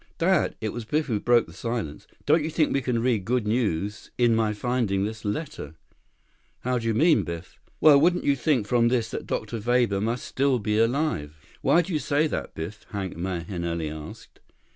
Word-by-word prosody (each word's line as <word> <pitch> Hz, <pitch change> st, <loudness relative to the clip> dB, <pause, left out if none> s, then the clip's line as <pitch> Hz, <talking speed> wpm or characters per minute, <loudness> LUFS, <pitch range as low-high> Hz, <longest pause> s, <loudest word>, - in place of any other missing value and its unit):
"Dad." 175 Hz, -1 st, +2 dB
It 110 Hz, -, -2 dB
was 120 Hz, +2 st, -5 dB
Biff 150 Hz, +8 st, 0 dB
who 115 Hz, -7 st, -1 dB
broke 120 Hz, +2 st, +3 dB
the -, -, -14 dB
silence. 115 Hz, -11 st, -4 dB, 0.2 s
"Don't 155 Hz, +1 st, +4 dB
you 155 Hz, -, -2 dB
think 160 Hz, -1 st, +1 dB
we 135 Hz, -, +1 dB
can 120 Hz, -2 st, -1 dB
read 120 Hz, -6 st, +1 dB
good 120 Hz, +1 st, 0 dB
news 105 Hz, -2 st, -1 dB
in 120 Hz, -2 st, +4 dB
my 110 Hz, -1 st, +2 dB
finding 105 Hz, -3 st, 0 dB
this 110 Hz, +1 st, -6 dB
letter?" 105 Hz, -, -4 dB, 0.9 s
"How 125 Hz, 0 st, 0 dB
do 115 Hz, -, -4 dB
you 115 Hz, -, +1 dB
mean, 160 Hz, +6 st, +4 dB
Biff?" 85 Hz, +1 st, -7 dB, 0.2 s
"Well, 145 Hz, -3 st, +7 dB
wouldn't 175 Hz, +2 st, +3 dB
you 140 Hz, -, +3 dB
think 135 Hz, -5 st, +1 dB
from 120 Hz, +2 st, +3 dB
this 120 Hz, -2 st, 0 dB
that -, -, -5 dB
Dr. 110 Hz, +1 st, -3 dB
Weber 120 Hz, -3 st, +1 dB
must 115 Hz, +3 st, -2 dB
still 135 Hz, -1 st, +1 dB
be 105 Hz, -1 st, 0 dB
alive?" 115 Hz, -, 0 dB, 0.2 s
"Why 175 Hz, -, +4 dB
do 180 Hz, -, -5 dB
you 155 Hz, -, +1 dB
say 145 Hz, +2 st, +1 dB
that, 155 Hz, -, -4 dB
Biff?" 85 Hz, +7 st, -6 dB
Hank 95 Hz, -3 st, -4 dB
Mahenili 85 Hz, -2 st, -3 dB
asked. 75 Hz, -1 st, -10 dB
115 Hz, 195 wpm, -26 LUFS, 100-135 Hz, 0.9 s, Well